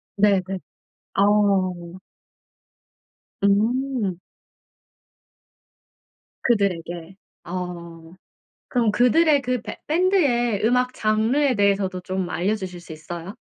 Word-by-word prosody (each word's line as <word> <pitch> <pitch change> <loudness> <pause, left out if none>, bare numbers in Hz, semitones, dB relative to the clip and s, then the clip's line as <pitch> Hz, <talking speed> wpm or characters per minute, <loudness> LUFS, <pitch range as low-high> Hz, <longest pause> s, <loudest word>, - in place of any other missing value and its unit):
네네. 200 -2 +4 0.7
아. 195 - +3 2.2
음. 220 0 +1 2.3
그들에게. 180 -5 -1 0.3
어. 170 -2 -7 0.6
그럼 235 -4 +2
그들의 280 +6 +4
그 250 -3 -2
배 - - -7
밴드의 290 - +2
음악 250 +2 +2
장르에 230 +6 +1
대해서도 195 -2 +1
좀 185 0 -3
알려주실 185 -1 -2
수 170 - -11
있어요? 170 +4 -8
205 Hz, 165 characters per minute, -23 LUFS, 180-245 Hz, 2.3 s, 네네